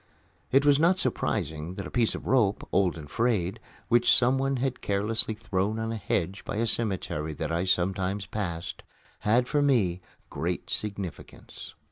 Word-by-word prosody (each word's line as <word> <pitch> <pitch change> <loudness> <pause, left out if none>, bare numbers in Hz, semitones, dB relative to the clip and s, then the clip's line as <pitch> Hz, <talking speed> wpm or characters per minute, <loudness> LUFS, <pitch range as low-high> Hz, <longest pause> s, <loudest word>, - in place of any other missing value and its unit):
It 135 +2 +4
was 145 -1 +5
not 175 +4 +4
surprising 80 - -1
that 100 - -5
a - - -8
piece 120 -3 +2
of - - -8
rope, 110 -6 +2
old 95 -3 +2
and 75 -2 -9
frayed, 110 0 0 0.3
which 120 0 +4
someone 135 +2 +3
had 130 0 -2
carelessly 105 +2 +1
thrown 105 -1 -1
on 110 0 -2
a - - -2
hedge 95 -1 -2
by - - -5
a 115 +2 +1
cemetery 95 -9 0
that 80 +1 -3
I 85 +2 0
sometimes 95 +2 0
passed, 90 -5 -4 0.4
had 120 +4 +2
for 145 +1 +1
me 105 -11 +2 0.3
great - - -3
significance. 100 -4 -5
105 Hz, 160 wpm, -27 LUFS, 90-120 Hz, 0.4 s, was